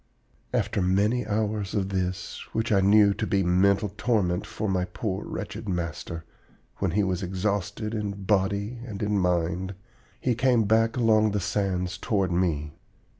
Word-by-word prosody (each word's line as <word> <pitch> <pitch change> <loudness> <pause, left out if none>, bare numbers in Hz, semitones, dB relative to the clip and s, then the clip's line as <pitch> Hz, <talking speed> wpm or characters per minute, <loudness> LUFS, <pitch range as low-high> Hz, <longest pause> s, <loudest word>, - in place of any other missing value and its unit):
"After - - 0
many 105 +6 +2
hours 105 -1 -1
of 95 -2 0
this, 90 -1 -3
which 110 +2 -1
I 100 -2 +4
knew 100 +1 +6
to 110 +1 -3
be 100 -1 +2
mental 100 +3 +3
torment 100 -6 +1
for 110 - -3
my 95 -2 +1
poor 95 +1 -3
wretched 100 +1 -5
master, 85 -1 -4 0.5
when 95 - 0
he 100 +5 +1
was 95 -1 -1
exhausted 100 +3 -2
in 100 -2 -3
body 100 +3 0
and 105 -4 -5
in 105 -1 +1
mind, 90 +1 0 0.4
he 125 - +1
came 120 -1 +3
back 115 +3 +2
along 110 -3 +4
the 105 - +1
sands 95 -2 -1
toward 100 -5 0
me. 80 -4 0
100 Hz, 155 wpm, -26 LUFS, 90-110 Hz, 0.5 s, knew